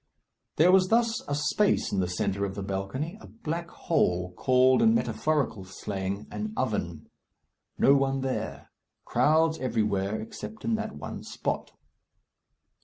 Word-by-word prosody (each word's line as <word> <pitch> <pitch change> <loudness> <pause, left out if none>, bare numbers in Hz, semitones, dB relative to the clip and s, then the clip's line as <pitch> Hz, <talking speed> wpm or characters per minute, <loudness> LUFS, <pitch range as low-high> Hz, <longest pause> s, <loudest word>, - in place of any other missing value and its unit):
There 170 +4 +5
was 185 0 +5
thus 230 +1 +2
a 145 - -1
space 150 +8 +1
in 100 - 0
the 90 - +1
centre 95 +2 -1
of 100 -1 -2
the 100 - -4
balcony, 100 - -4
a - - -11
black 170 -5 -5
hole, 90 - 0
called 130 +5 +4
in 225 0 +5
metaphorical 145 - 0
slang, 95 +1 -4
an 215 0 -4
oven. 85 -10 -2 0.7
No 140 - +6
one 135 -1 +2
there. 130 -1 -4 0.3
Crowds 160 +1 +3
everywhere 105 -4 0
except 165 - -8
in 230 - +1
that 220 -1 -2
one - - -6
spot. - - -4
130 Hz, 140 wpm, -28 LUFS, -, 0.7 s, No